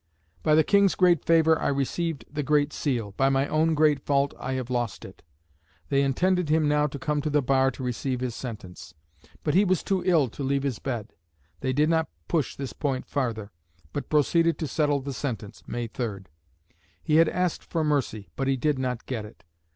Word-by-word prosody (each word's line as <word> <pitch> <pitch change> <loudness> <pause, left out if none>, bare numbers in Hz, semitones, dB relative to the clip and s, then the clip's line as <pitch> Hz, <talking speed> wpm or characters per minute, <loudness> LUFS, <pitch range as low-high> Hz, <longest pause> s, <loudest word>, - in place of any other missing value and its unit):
"By 155 - +3
the 160 - +5
King's 200 +1 +4
great 175 -4 +4
favour 160 -1 +4
I - - 0
received 145 +3 -1
the 150 0 -4
Great 145 0 +2
Seal; 120 -8 -2
by 135 0 +3
my 135 +1 +1
own 160 +1 +2
great 150 -2 +4
fault 140 0 +1
I 130 - -3
have 130 -1 -4
lost 120 -4 -2
it." - - -13 0.7
They 140 -1 +3
intended 175 +5 +1
him 155 0 +3
now 150 0 +3
to 140 - -6
come 145 +2 -1
to 155 - -2
the 150 -1 +2
bar 135 0 +3
to 135 - -7
receive 125 +1 -2
his 125 -2 -2
sentence. 90 -8 -8 0.5
But 150 - 0
he 195 - +5
was 185 -4 +1
too 190 -2 0
ill 165 -7 +3
to 130 - -9
leave 140 0 0
his 135 -5 -2
bed. 115 -10 -4 0.5
They 130 - -1
did 150 +4 +2
not 160 0 +1 0.2
push 160 -5 0
this 135 -2 -5
point 135 -4 -2
farther, 115 -7 -3 0.4
but 145 - -4
proceeded 165 +3 +3
to 155 - -3
settle 145 -1 +1
the 140 +1 -5
sentence 110 -5 -5
(May 120 0 -3
3). 110 -4 -4 0.8
He 155 -1 +3
had 165 -1 +6
asked 180 -2 -1
for 165 -2 -2
mercy, 135 -9 -1
but 135 - -2
he 135 -1 +2
did 145 +1 0
not 125 -2 -3
get 120 -5 -3
it. 105 - -13
140 Hz, 205 wpm, -26 LUFS, 130-155 Hz, 0.8 s, had